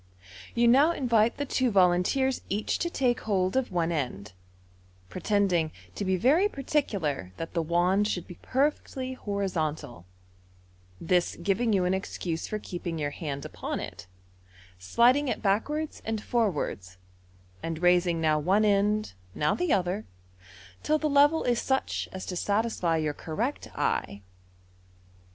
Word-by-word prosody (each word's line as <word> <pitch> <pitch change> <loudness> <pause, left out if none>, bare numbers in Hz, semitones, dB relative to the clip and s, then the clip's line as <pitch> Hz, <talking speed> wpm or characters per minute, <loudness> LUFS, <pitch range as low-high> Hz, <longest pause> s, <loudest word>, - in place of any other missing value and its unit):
You 235 0 +4
now 280 +8 +5
invite 235 -6 +2
the 285 - -2
two 260 -2 +1
volunteers 195 +7 +2
each 205 +3 -1
to 345 - -1
take 255 -7 +1
hold 190 -2 0
of 265 -5 0
one 170 -2 0
end, 115 - -3 0.8
pretending 180 - +1 0.2
to - - -4
be 190 -1 +1
very 305 - +4
particular 200 - -2
that 165 - -6
the 170 - +1
wand 175 +5 +2
should 180 -5 -2
be 180 - -12
perfectly 265 -1 -1
horizontal, 175 - -3 0.9
this 175 +1 +1
giving 200 +7 0
you 190 -3 +2
an 180 - +1
excuse 180 -3 -3
for 215 - -3
keeping 175 -4 -5
your 145 -2 -2
hand 145 -4 -5
upon - - -4
it, - - -8 0.7
sliding 245 - +3
it 245 - -2
backwards 295 +10 -1
and 220 -1 -2
forwards, 150 - -1 0.6
and 165 +1 -4
raising 175 -1 +3
now 155 -1 +2
one 195 +8 +2
end, 210 - +2 0.2
now 150 0 +1
the 355 -3 -1
other, 185 +2 0 0.7
till 310 - +2
the 310 - -1
level 290 +3 +4
is 240 -2 +1
such 265 0 -1
as 190 - -6
to 180 - -5
satisfy 200 -4 0
your 155 -2 -1
correct 215 - -3
eye. 100 0 -1
195 Hz, 140 wpm, -28 LUFS, 170-245 Hz, 0.9 s, now